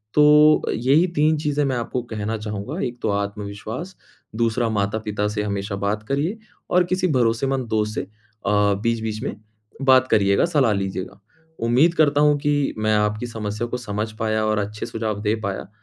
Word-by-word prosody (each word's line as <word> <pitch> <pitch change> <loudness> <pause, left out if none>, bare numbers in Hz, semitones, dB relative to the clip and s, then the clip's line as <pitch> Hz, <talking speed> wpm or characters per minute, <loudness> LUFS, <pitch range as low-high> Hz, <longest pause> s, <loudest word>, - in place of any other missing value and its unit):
तो 150 +1 +6
यही 140 +10 +3
तीन 155 +1 +3
चीज़ें 150 -1 0
मैं 130 -2 0
आपको 120 +1 -2
कहना 110 +1 -2
चाहूँगा, 105 - -5
एक 120 0 -6
तो 110 - +1
आत्मविश्वास, 105 - -4 0.4
दूसरा 115 0 +1
माता-पिता 105 0 -1
से 105 0 -2
हमेशा 100 -1 -3
बात 105 +1 -1
करिए, 155 +10 0 0.3
और 180 0 +5
किसी 185 0 +1
भरोसेमंद 125 +3 0
दोस्त 105 0 0
से - - -1
अ, 105 -1 -1
बीच-बीच 110 -1 -1
में 120 - -3 0.5
बात 130 -1 +5
करिएगा, 100 +1 +4
सलाह 145 -9 +2
लीजिएगा। 95 0 -4 0.5
उम्मीद 135 +9 +4
करता 145 -2 +3
हूँ 150 -1 +4
कि 145 -1 0
मैं 110 0 +1
आपकी 105 +3 0
समस्या 110 0 -4
को 125 - -3
समझ 110 -2 -4
पाया 110 -1 0
और 110 0 +1
अच्छे 105 +1 -4
सुझाव 110 -2 -3
दे 105 +1 +1
पाया, 95 -1 -4
110 Hz, 165 wpm, -22 LUFS, 105-135 Hz, 0.5 s, तो